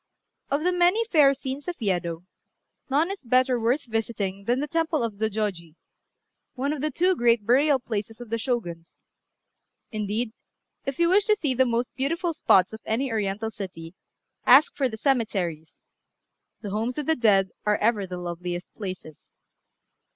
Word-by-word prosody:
Of 285 +3 0
the 360 - +2
many 360 +6 +3
fair 295 -10 +5
scenes 270 +3 -6
of 350 -3 -4
Yedo, 175 -5 -2 0.6
none 305 +7 +2
is 395 - -7
better 255 +1 +2
worth 245 +6 +1
visiting 215 -4 -3
than 245 +3 +1
the 295 - -2
temple 320 -3 0
of 230 -2 -2
Zôjôji, 200 -6 -3 0.8
one 275 +3 -1
of 295 - -5
the 305 - 0
two 360 +6 +2
great 235 -5 +2
burial 275 +5 +4
places 225 -2 -5
of 240 -3 -10
the 230 - 0
Shoguns; 175 -10 -4 0.9
indeed, 215 +1 -2 0.5
if 275 - -2
you 340 - +3
wish 400 +3 +4
to 425 - +4
see 295 -10 -1
the 260 +1 +3
most 235 +1 -1
beautiful 330 +6 -1
spots 190 - +3
of 220 - -8
any 250 +4 -1
Oriental 215 0 -2
city, 180 -5 -8 0.5
ask 270 +5 +6
for 270 -3 +1
the 220 - -7
cemeteries: 195 - -1 0.8
the 205 - -5
homes 225 +5 -2
of 300 - -2
the 320 - +2
dead 200 -7 +3 0.2
are 210 - +3
ever 210 -3 +1
the 180 0 -6
loveliest 175 0 -5
places. 185 -7 -8
235 Hz, 165 wpm, -25 LUFS, 200-280 Hz, 0.9 s, ask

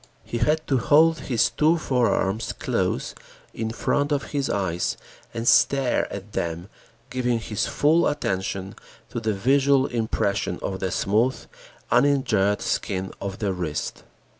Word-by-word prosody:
He 120 - -4
had 155 +4 +1
to 135 -3 +1
hold 160 +5 +4
his 120 -4 +1
two 160 +3 +3
forearms 115 -7 0
close - - -2 0.4
in 110 -1 -3
front 145 +5 0
of 140 -1 -1
his 140 -2 -1
eyes 95 -4 -1 0.3
and 115 0 -4
stare 135 -3 +3
at 100 +1 -7
them, 85 +3 -3 0.4
giving 125 -2 0
his 110 -2 -2
full 160 +4 +3
attention 95 -8 -2 0.4
to - - -3
the 110 -1 -1
visual 135 +5 +3
impression 110 -6 -1
of 95 -1 -3
the 95 - -1
smooth, 110 +8 0 0.5
uninjured 110 -8 +2
skin 95 -1 -2
of 100 -1 -4
the 100 -3 -1
wrist. 85 -5 -4
115 Hz, 140 wpm, -24 LUFS, 100-140 Hz, 0.5 s, hold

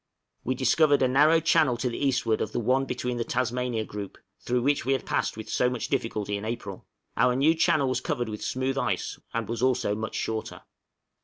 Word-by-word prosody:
We 130 - -1
discovered 145 +3 +3
a - - +4
narrow 150 +5 +5
channel 160 -6 +3
to 125 - -1
the 120 - -3
eastward 125 -5 +1
of - - -3
the - - 0
one 130 +4 +2
between 125 -2 -3
the 120 - 0
Tasmania 125 -2 -1
Group, 100 -2 -7 0.2
through 125 0 -1
which 145 +2 +2
we 135 +3 +1
had 135 - -2
passed - - -1
with 110 - -7
so 125 - +1
much 125 -2 -4
difficulty 105 -2 -1
in 100 - -7
April; 110 -4 -6 0.3
our 125 +2 +3
new 145 +5 +4
channel 155 -3 +2
was 130 - -1
covered 120 -1 -2
with 105 -1 -6
smooth 130 +1 -1
ice, - - -2
and 115 -2 -2
was 115 0 -4
also 125 -4 +1
much 110 +1 -4
shorter. 110 -1 -3
125 Hz, 210 wpm, -27 LUFS, 115-135 Hz, 0.3 s, narrow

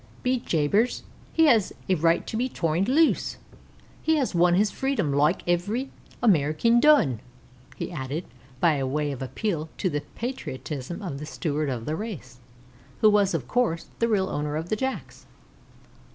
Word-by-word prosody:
"Be 255 0 +1
jabers, 200 +6 +1 0.3
he 325 - +4
has 230 -9 +4
a 190 - +3
right 165 0 +2
to - - -5
be 250 +3 0
torned 170 +1 0
loose. 310 +4 +2 0.6
He 320 - +2
has 275 -5 0
won 175 0 +4
his 205 +2 +2
freedom 255 - -1
loike 150 +5 +2
ivery 205 +10 0 0.3
Amerikin 190 +4 +3
done," 270 - +5 0.6
he - - -5
added, 150 +1 -4 0.3
by 150 -4 +3
way 145 +2 -1
of 135 - -6
appeal 160 +3 -3
to 185 - 0
the 145 0 -1
patriotism 170 - -5
of 140 -8 -5
the 150 - -7
Steward 155 -2 -2
of 120 -3 -4
the 155 - -2
race, 160 - -7 0.6
who 215 - +6
was, 200 -3 +3
of 130 -7 -3
course, 225 - 0
the 230 - +2
real 200 -4 +1
owner 150 0 -2
of 160 +3 -4
the - - +1
Jacks. 265 +4 -5
175 Hz, 165 wpm, -26 LUFS, 150-230 Hz, 0.6 s, who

